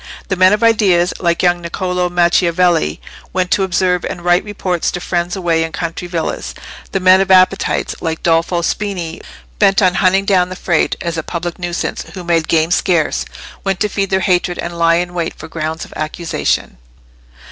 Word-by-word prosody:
The 190 Hz, -, +1 dB
men 185 Hz, 0 st, +5 dB
of 210 Hz, +2 st, +1 dB
ideas, 195 Hz, -6 st, +3 dB
like 170 Hz, -1 st, 0 dB
young 175 Hz, -1 st, +2 dB
Niccolò 180 Hz, +1 st, -2 dB
Macchiavelli, 175 Hz, -, +2 dB, 0.3 s
went 180 Hz, -1 st, -1 dB
to -, -, +3 dB
observe 180 Hz, -1 st, +1 dB
and 175 Hz, -, -5 dB
write 175 Hz, 0 st, +3 dB
reports 190 Hz, -4 st, -2 dB
to 180 Hz, -, -4 dB
friends 175 Hz, 0 st, -2 dB
away 170 Hz, -3 st, +1 dB
in 165 Hz, -, -4 dB
country 170 Hz, +1 st, -4 dB
villas; 170 Hz, -2 st, -3 dB, 0.4 s
the 195 Hz, -, 0 dB
men 185 Hz, +1 st, +5 dB
of 195 Hz, -, -1 dB
appetites, 185 Hz, +1 st, +3 dB
like 160 Hz, -1 st, -3 dB
Dolfo 170 Hz, +1 st, +1 dB
Spini, 180 Hz, -5 st, -3 dB, 0.4 s
bent 195 Hz, -2 st, +4 dB
on 185 Hz, -3 st, +3 dB
hunting 190 Hz, +1 st, +2 dB
down 185 Hz, -3 st, +2 dB
the 185 Hz, -, -6 dB
Frate, 175 Hz, -3 st, 0 dB
as 170 Hz, -1 st, -2 dB
a -, -, -1 dB
public 170 Hz, +2 st, -5 dB
nuisance 175 Hz, 0 st, -3 dB
who 185 Hz, -, -6 dB
made 170 Hz, -2 st, +1 dB
game 160 Hz, 0 st, +2 dB
scarce, 175 Hz, -3 st, +1 dB, 0.4 s
went 195 Hz, -2 st, -1 dB
to 210 Hz, -, +3 dB
feed 195 Hz, -1 st, -2 dB
their 190 Hz, 0 st, +1 dB
hatred 180 Hz, -2 st, +1 dB
and 170 Hz, 0 st, -5 dB
lie 165 Hz, 0 st, +4 dB
in 175 Hz, +1 st, -2 dB
wait 170 Hz, -2 st, -3 dB
for 155 Hz, -, -10 dB
grounds 160 Hz, 0 st, -4 dB
of -, -, -15 dB
accusation. 155 Hz, -, -2 dB
175 Hz, 185 wpm, -16 LUFS, 170-185 Hz, 0.4 s, men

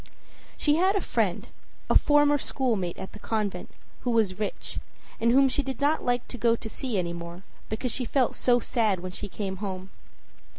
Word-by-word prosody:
She 295 Hz, 0 st, +3 dB
had 380 Hz, +4 st, +3 dB
a -, -, +3 dB
friend, -, -, 0 dB, 0.4 s
a -, -, +2 dB
former 290 Hz, -1 st, +5 dB
schoolmate 220 Hz, -13 st, -1 dB
at 190 Hz, -, -7 dB
the 210 Hz, -, -11 dB
convent, 205 Hz, -5 st, -2 dB, 0.3 s
who 250 Hz, -, -3 dB
was 215 Hz, -5 st, +2 dB
rich, 210 Hz, -, -4 dB, 0.4 s
and 230 Hz, 0 st, +3 dB
whom 270 Hz, +2 st, +6 dB
she 265 Hz, -, +1 dB
did 265 Hz, -3 st, -5 dB
not 295 Hz, +3 st, +2 dB
like 245 Hz, 0 st, 0 dB
to 245 Hz, -, -7 dB
go 230 Hz, 0 st, +4 dB
to 225 Hz, -1 st, -7 dB
see 240 Hz, 0 st, -2 dB
any 170 Hz, -2 st, -1 dB
more 170 Hz, +2 st, -7 dB, 0.3 s
because 230 Hz, +3 st, -2 dB
she 255 Hz, -, -1 dB
felt 255 Hz, 0 st, +2 dB
so 245 Hz, -1 st, +3 dB
sad 215 Hz, -6 st, +1 dB
when 185 Hz, 0 st, -5 dB
she 205 Hz, +2 st, -6 dB
came 190 Hz, -1 st, -4 dB
home. 190 Hz, -1 st, -5 dB
230 Hz, 195 wpm, -27 LUFS, 190-265 Hz, 0.4 s, whom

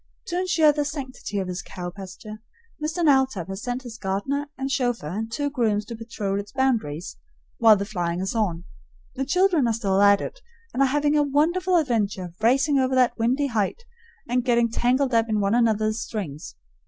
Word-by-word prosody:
To 350 Hz, 0 st, -1 dB
insure 345 Hz, -4 st, +4 dB
the 295 Hz, 0 st, -1 dB
sanctity 270 Hz, -7 st, -5 dB
of 190 Hz, -2 st, -1 dB
his 180 Hz, 0 st, -4 dB
cow 175 Hz, -1 st, -7 dB
pasture, 200 Hz, +3 st, -10 dB, 0.4 s
Mr. 325 Hz, +3 st, -1 dB
Knowltop 265 Hz, -, +2 dB
has 195 Hz, +1 st, -5 dB
sent 245 Hz, +1 st, -3 dB
his 235 Hz, -2 st, -9 dB
gardener 240 Hz, +10 st, -2 dB
and 270 Hz, +1 st, -3 dB
chauffeur 245 Hz, -, 0 dB
and 220 Hz, +6 st, -4 dB
two 285 Hz, +4 st, -2 dB
grooms 215 Hz, -6 st, 0 dB
to 230 Hz, -, -7 dB
patrol 215 Hz, -3 st, -3 dB
its 205 Hz, 0 st, -7 dB
boundaries 225 Hz, -, -1 dB, 0.4 s
while 225 Hz, -2 st, +7 dB
the 200 Hz, 0 st, -2 dB
flying 175 Hz, -4 st, -2 dB
is 190 Hz, +1 st, -2 dB
on. 185 Hz, -7 st, -1 dB, 0.5 s
The 270 Hz, -, -3 dB
children 355 Hz, -3 st, +3 dB
are 230 Hz, -, +1 dB
still 200 Hz, -4 st, +1 dB
at 200 Hz, 0 st, +6 dB
it, -, -, -7 dB, 0.3 s
and 265 Hz, -, 0 dB
are 275 Hz, -, +5 dB
having 295 Hz, +2 st, +1 dB
a 300 Hz, -, +4 dB
wonderful 335 Hz, +6 st, +1 dB
adventure 210 Hz, -, -1 dB
racing 270 Hz, +5 st, +3 dB
over 260 Hz, 0 st, +1 dB
that 245 Hz, -2 st, +2 dB
windy 255 Hz, +5 st, +1 dB
height 230 Hz, -, -1 dB, 0.4 s
and 245 Hz, +1 st, +1 dB
getting 235 Hz, -2 st, +2 dB
tangled 255 Hz, +3 st, +1 dB
up 230 Hz, 0 st, +2 dB
in 215 Hz, -1 st, +1 dB
one 200 Hz, +1 st, +1 dB
another's 220 Hz, -1 st, +2 dB
strings. 155 Hz, -, -6 dB
235 Hz, 190 wpm, -24 LUFS, 200-275 Hz, 0.5 s, while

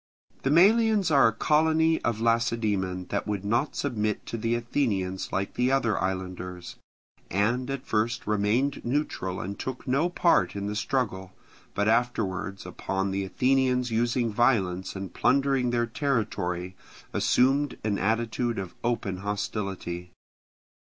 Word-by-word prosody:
The 135 Hz, -, 0 dB
Melians 205 Hz, +3 st, +4 dB
are 140 Hz, -4 st, +6 dB
a -, -, +2 dB
colony 160 Hz, +6 st, +2 dB
of 115 Hz, -2 st, -1 dB
Lacedaemon 110 Hz, -6 st, 0 dB
that 100 Hz, -, -2 dB
would 100 Hz, -2 st, -3 dB
not 120 Hz, +8 st, 0 dB
submit 110 Hz, -6 st, -1 dB
to -, -, -5 dB
the 115 Hz, +1 st, 0 dB
Athenians 110 Hz, -6 st, -1 dB
like 100 Hz, +1 st, -2 dB
the 125 Hz, +1 st, +1 dB
other 120 Hz, -6 st, +2 dB
islanders, 90 Hz, -1 st, -4 dB, 0.5 s
and 120 Hz, +7 st, 0 dB
at 135 Hz, 0 st, -4 dB
first 115 Hz, +1 st, 0 dB
remained 105 Hz, +7 st, +1 dB
neutral 120 Hz, -8 st, -2 dB
and 100 Hz, +3 st, -5 dB
took 130 Hz, 0 st, -5 dB
no 140 Hz, +7 st, +2 dB
part 175 Hz, -8 st, +2 dB
in 100 Hz, 0 st, -3 dB
the 105 Hz, +1 st, -3 dB
struggle, 100 Hz, -6 st, -2 dB, 0.4 s
but 100 Hz, +1 st, +1 dB
afterwards 110 Hz, -5 st, 0 dB
upon 95 Hz, 0 st, -2 dB
the 100 Hz, 0 st, -1 dB
Athenians 125 Hz, +2 st, +1 dB
using 115 Hz, 0 st, +1 dB
violence 100 Hz, -7 st, +1 dB
and 95 Hz, -1 st, -6 dB
plundering 135 Hz, -2 st, +2 dB
their 120 Hz, -1 st, +1 dB
territory, 105 Hz, -, -2 dB, 0.4 s
assumed 135 Hz, +2 st, +2 dB
an 105 Hz, -2 st, 0 dB
attitude 115 Hz, +3 st, 0 dB
of 95 Hz, -2 st, -5 dB
open 115 Hz, -6 st, -1 dB
hostility. 95 Hz, -3 st, -4 dB
115 Hz, 135 wpm, -27 LUFS, 95-130 Hz, 0.5 s, are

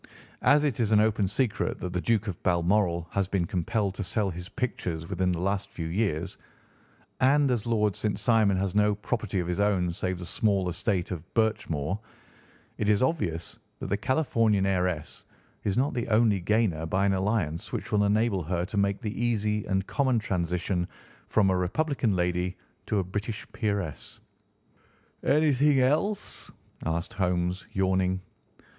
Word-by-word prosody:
As 145 Hz, +1 st, +5 dB
it 135 Hz, -6 st, -1 dB
is 110 Hz, -2 st, +1 dB
an 105 Hz, -, +6 dB
open 105 Hz, -2 st, +2 dB
secret 105 Hz, +3 st, -1 dB
that 90 Hz, -1 st, -4 dB
the 90 Hz, -, -1 dB
Duke 110 Hz, -1 st, +1 dB
of 95 Hz, -5 st, -4 dB
Balmoral 85 Hz, -1 st, +2 dB
has 100 Hz, -2 st, 0 dB
been 95 Hz, -3 st, 0 dB
compelled 100 Hz, +3 st, -1 dB
to 100 Hz, -, -4 dB
sell 100 Hz, +1 st, 0 dB
his 90 Hz, +2 st, -7 dB
pictures 85 Hz, -, -3 dB
within 95 Hz, -1 st, 0 dB
the 85 Hz, -, -2 dB
last 100 Hz, +2 st, -1 dB
few 80 Hz, -, -5 dB
years, 90 Hz, -1 st, -1 dB, 0.8 s
and 140 Hz, +1 st, +4 dB
as 120 Hz, -2 st, -1 dB
Lord 105 Hz, -3 st, +2 dB
St. 105 Hz, -2 st, -1 dB
Simon 105 Hz, -3 st, +3 dB
has 95 Hz, -1 st, -1 dB
no 105 Hz, 0 st, +3 dB
property 105 Hz, -2 st, -2 dB
of 85 Hz, -, -4 dB
his 90 Hz, +2 st, -2 dB
own 95 Hz, -4 st, +2 dB
save 90 Hz, +1 st, -2 dB
the 90 Hz, -, -7 dB
small 95 Hz, +1 st, +1 dB
estate 90 Hz, 0 st, -1 dB
of 85 Hz, -1 st, -6 dB
Birchmoor, 95 Hz, -6 st, 0 dB, 0.8 s
it 105 Hz, -, +1 dB
is 105 Hz, +3 st, +4 dB
obvious 85 Hz, -, -1 dB, 0.2 s
that -, -, -5 dB
the -, -, +3 dB
Californian 115 Hz, -5 st, +2 dB
heiress 90 Hz, -5 st, -1 dB, 0.4 s
is 100 Hz, +2 st, 0 dB
not 135 Hz, +3 st, +2 dB
the 120 Hz, -3 st, -2 dB
only 110 Hz, -2 st, +3 dB
gainer 90 Hz, -4 st, +1 dB
by 95 Hz, +4 st, +1 dB
an 100 Hz, -, +3 dB
alliance 95 Hz, -5 st, -1 dB
which -, -, -4 dB
will 105 Hz, -1 st, +3 dB
enable 105 Hz, -1 st, +2 dB
her 85 Hz, +2 st, -1 dB
to 100 Hz, +2 st, -5 dB
make 100 Hz, +1 st, +1 dB
the 110 Hz, +1 st, -3 dB
easy 105 Hz, -3 st, 0 dB
and 95 Hz, 0 st, 0 dB
common 130 Hz, -1 st, +1 dB
transition 90 Hz, -3 st, -1 dB, 0.4 s
from 100 Hz, -3 st, +3 dB
a -, -, +2 dB
Republican 115 Hz, -, 0 dB
lady 90 Hz, +1 st, 0 dB, 0.3 s
to 105 Hz, -, 0 dB
a 95 Hz, -, +2 dB
British 105 Hz, +4 st, -4 dB
peeress.'" 100 Hz, -8 st, -3 dB, 1.0 s
"Anything 145 Hz, -1 st, +4 dB
else?" 155 Hz, +11 st, 0 dB, 0.4 s
asked 85 Hz, +1 st, -2 dB
Holmes, 90 Hz, -1 st, -1 dB
yawning. 95 Hz, -1 st, +1 dB
100 Hz, 165 wpm, -28 LUFS, 90-110 Hz, 1.0 s, an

